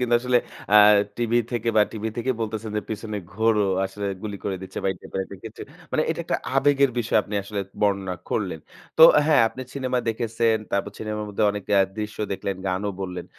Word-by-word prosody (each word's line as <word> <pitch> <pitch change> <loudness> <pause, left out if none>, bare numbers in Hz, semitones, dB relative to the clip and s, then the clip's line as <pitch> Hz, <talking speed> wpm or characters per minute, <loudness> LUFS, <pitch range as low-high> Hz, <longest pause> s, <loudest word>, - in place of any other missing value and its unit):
কিন্তু 120 -1 +2
আসলে 125 0 +3 0.4
আ - - +10 0.4
টিভি 120 0 +1
থেকে 120 -1 -1
বা 105 - +7
টিভি 110 0 -3
থেকে 125 +2 -1
বলতেছেন 110 0 -3
যে, 105 - -1
“পিছনে 105 0 -4 0.2
ঘোরো, 110 0 +2 0.2
আসলে 100 +1 -4 0.2
গুলি 105 -2 -4
করে 95 -2 -1
দিচ্ছে” 95 - -7
বা - - +1
এই - - -14
টাইপের 95 - -5
একটা 100 - -11
কিছু। 110 - -9 0.3
মানে 155 - +2
এটা 165 - -2
একটা 170 0 0 0.2
আবেগের 140 -1 +4
বিষয়, 115 -1 +2
আপনি 105 - -7
আসলে 100 0 -4 0.2
বর্ণনা 100 -2 +1
করলেন। 90 -7 -2 0.4
তো - - +8 0.2
হ্যাঁ, 150 -6 +5
আপনি 130 - -10
সিনেমা 130 -2 -1
দেখেছেন। 115 0 +1
তারপর 100 - -1
সিনেমার 105 -1 -4
মধ্যে 105 - -2
অনেক 100 -1 -5
এ - - +6 0.2
দৃশ্য 105 0 -5
দেখলেন, 95 0 -3
গানও 95 +2 -1
বললেন। 90 -2 -4
110 Hz, 195 wpm, -24 LUFS, 100-120 Hz, 0.4 s, আ